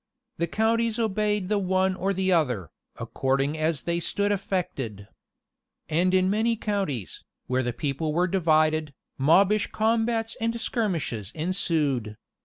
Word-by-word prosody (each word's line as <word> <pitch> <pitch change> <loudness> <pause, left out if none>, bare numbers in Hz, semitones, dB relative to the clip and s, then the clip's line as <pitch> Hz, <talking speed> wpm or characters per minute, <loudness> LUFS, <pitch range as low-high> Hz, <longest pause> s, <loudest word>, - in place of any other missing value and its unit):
The 170 - +1
counties 225 +4 +1
obeyed 210 -3 0
the 210 +1 +1
one 190 0 +1
or 190 +1 -1
the 190 0 0
other, 125 - +1 0.2
according 135 +2 -1
as 155 -2 -1
they 170 0 0
stood 205 +4 0
affected. 140 - -3 0.8
And 180 +4 +2
in 185 0 +3
many 220 +4 +2
counties, 195 - -3 0.2
where 130 0 0
the 120 -1 -1
people 150 +4 -2
were 175 +4 +2
divided, 155 -4 +2 0.2
mobbish 195 +9 +4
combats 225 +1 0
and 230 +1 -1
skirmishes 165 - -2
ensued. 150 - 0
180 Hz, 130 wpm, -26 LUFS, 150-205 Hz, 0.8 s, mobbish